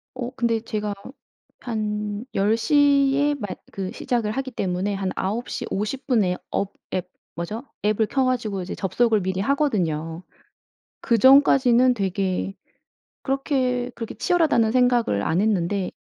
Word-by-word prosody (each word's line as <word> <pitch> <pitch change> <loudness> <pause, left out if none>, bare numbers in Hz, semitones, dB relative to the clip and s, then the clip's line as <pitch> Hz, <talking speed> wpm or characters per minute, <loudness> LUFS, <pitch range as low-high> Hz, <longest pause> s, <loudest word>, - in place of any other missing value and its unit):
어 245 -1 -4
근데 235 -2 +1
제가 210 -2 -3 0.7
한 210 -2 -3
10 210 +3 +2
시에 285 +1 +3
마 225 -7 -5 0.2
그 190 -1 -4
시작을 230 -4 -1
하기 265 +3 -3
때문에 190 -2 -2
한 195 -1 -2
9 215 +6 -2
시 - - -4
50 215 +7 -3
분에 210 -9 +2
업 200 0 -2 0.2
앱 180 -1 -2 0.3
뭐죠? 210 +8 -5 0.2
앱을 215 +1 +2
켜 265 +2 +1
가지고 230 -6 -1
이제 180 - -5
접속을 215 +3 +1
미리 190 0 -2
하거든요. 180 - -1 0.8
그전까지는 255 0 +5
되게 195 -1 -2 0.7
그렇게, 260 -3 0
그렇게 230 -2 -6
치열하다는 310 -11 +2
생각을 245 - +2
안 165 - +1
했는데 195 -2 0
220 Hz, 255 characters per minute, -23 LUFS, 195-255 Hz, 0.8 s, 그전까지는